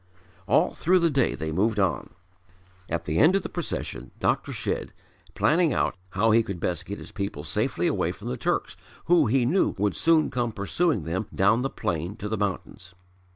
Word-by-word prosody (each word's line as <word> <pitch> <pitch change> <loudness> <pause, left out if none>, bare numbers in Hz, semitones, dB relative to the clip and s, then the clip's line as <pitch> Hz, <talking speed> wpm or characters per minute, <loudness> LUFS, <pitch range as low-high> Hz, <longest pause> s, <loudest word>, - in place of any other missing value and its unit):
All - - +3
through 185 +3 +3
the 170 -2 +2
day 135 -4 +2
they 80 0 -4
moved 105 +6 +1
on, 95 -3 0 0.8
at 85 0 -2
the 80 +2 0
end 180 +5 +6
of 195 - +1
the - - -5
procession 175 -3 -5
Dr. - - 0
Shedd, - - -3 0.4
planning 165 -2 +3
out - - +1 0.2
how 115 +4 +3
he 115 +2 +5
could 100 -5 -5
best 85 0 -2
get 100 - -5
his - - -10
people 100 -8 -4
safely - - -1
away - - +1
from - - -9
the 65 - -2
Turks - - -1 0.3
who 170 -5 +4
he 125 +2 +2
knew 175 +10 +2
would 100 0 0
soon 160 -2 +3
come 120 -2 -1
pursuing 110 - 0
them 95 +7 -3
down 105 +5 +3
the 135 - -1
plain 85 - -3
to 105 -2 -6
the 110 - -1
mountains. 95 -3 -4
110 Hz, 195 wpm, -26 LUFS, 95-145 Hz, 0.8 s, end